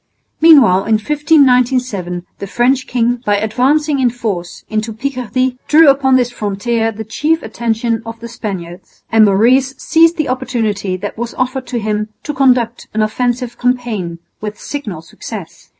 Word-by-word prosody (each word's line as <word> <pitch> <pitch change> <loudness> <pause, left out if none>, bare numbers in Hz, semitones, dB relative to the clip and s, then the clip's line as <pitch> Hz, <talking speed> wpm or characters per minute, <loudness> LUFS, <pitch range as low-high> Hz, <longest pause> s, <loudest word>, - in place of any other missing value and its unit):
Meanwhile 265 - +6
in 225 - +2
1597 250 - +1
the 200 - -5
French 250 +5 +1
king, 240 0 0
by 205 -3 +1
advancing 275 +8 +1
in 255 -2 +3
force 195 -7 -5
into 215 +1 -2
Picardy, 255 +1 -2
drew 310 0 +6
upon 270 -1 +3
this 245 -1 +2
frontier 225 +1 -1
the 220 0 -7
chief 305 +9 -1
attention 225 0 -2
of 225 0 -8
the 235 - -7
Spaniards; 185 -6 -8
and 225 -1 +6
Maurice 250 +7 +3
seized 330 +3 +3
the 310 - -1
opportunity 215 -7 -2
that 205 +3 -6
was 235 0 -4
offered 255 0 -2
to 245 - -3
him 215 -1 -2
to 295 - -4
conduct 250 -3 +1
an 220 - +2
offensive 245 +2 -2
campaign 240 -9 -1 0.2
with 210 0 -6
signal 210 - -6
success. 165 - -9
235 Hz, 150 wpm, -15 LUFS, 215-260 Hz, 0.2 s, Meanwhile